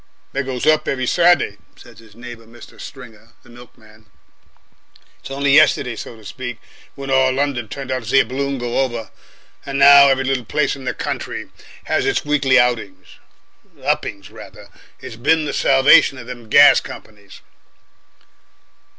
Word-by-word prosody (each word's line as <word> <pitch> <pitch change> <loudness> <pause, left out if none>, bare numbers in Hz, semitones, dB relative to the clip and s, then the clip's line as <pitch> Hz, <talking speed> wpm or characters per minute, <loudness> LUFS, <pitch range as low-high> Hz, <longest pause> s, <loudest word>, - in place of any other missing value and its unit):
"They 140 - -2
goes 130 -2 -5
up 155 0 +2
every 130 -1 -2
Saturday," 175 - +2 0.2
said 115 -3 -17
his 110 -2 -19
neighbour, 120 -1 -12
Mr. 120 +1 -15
Stringer, 115 -4 -13
the 120 - -19
milkman. 110 -3 -18 1.1
"It's - - -12
only 140 0 0
yestiday, 140 -5 +3
so 115 - -9
to 110 -2 -18
speak, 125 +1 -7 0.4
when 135 -1 -7
all 130 0 +3
London 130 -3 -2
turned 135 +3 -7
out 130 0 -2
to 110 - -9
see 135 - +4
a - - +2
balloon 140 +1 -4
go 120 0 -3
over, 120 -4 -3 0.5
and 140 -1 -5
now 140 0 +8
every 135 -1 +1
little 135 -1 -2
place 140 +5 -1
in 135 -1 -12
the 125 - -3
country - - -6 0.3
has - - -1
its - - -1
weekly 145 -2 +2
outings 110 -7 -3 0.6
uppings, 100 -2 -3
rather. - - -14 0.3
It's 115 - -10
been 155 +6 +1
the 140 - -4
salvation 135 +1 +4
of 120 - -10
them 120 -2 -11
gas 140 +3 +6
companies." 105 -2 -13
130 Hz, 160 wpm, -18 LUFS, 115-140 Hz, 1.1 s, now